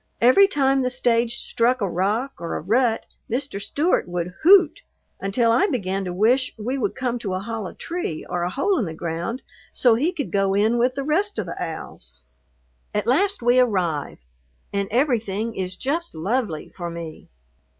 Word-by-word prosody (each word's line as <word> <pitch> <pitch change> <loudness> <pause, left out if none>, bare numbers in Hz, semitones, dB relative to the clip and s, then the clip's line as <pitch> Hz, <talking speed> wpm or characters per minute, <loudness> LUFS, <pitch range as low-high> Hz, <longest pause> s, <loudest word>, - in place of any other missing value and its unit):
Every 255 +12 +6
time 270 -6 +2
the 255 - +1
stage 240 -2 +1
struck 245 +2 +1
a 200 - 0
rock 210 +10 -1
or 170 -1 -4
a - - -2
rut 225 +5 +1 0.2
Mr. 245 -4 -2
Stewart 300 - +1
would 175 0 -3
"hoot," 370 +4 +6 0.4
until 230 +4 +1
I 360 - +4
began 195 - -2
to 180 - -3
wish 235 +8 +2
we 235 +5 -2
would 270 - -1
come 245 -2 -2
to 195 -5 -3
a - - -1
hollow 220 -1 -5
tree 340 - -4
or 175 -1 -2
a 175 - 0
hole 365 - +1
in 225 - 0
the 160 -2 -6
ground 170 +10 -4 0.3
so 245 -3 +4
he 285 +10 +1
could 300 -8 -4
go 195 -1 +1
in 220 +4 +2
with 250 +2 +2
the 275 - -2
rest 380 +8 0
of 205 - -1
the 170 - -5
owls. 65 - -8 0.8
At 210 -1 0
last 375 - +1
we 245 +1 +5
"arriv," 180 - 0 0.6
and 200 0 0
everything 230 -4 0
is 185 -1 -3
just 320 - -3
lovely 190 -1 -2
for 175 -2 -4
me. 170 -2 -8
230 Hz, 180 wpm, -23 LUFS, 190-265 Hz, 0.8 s, Every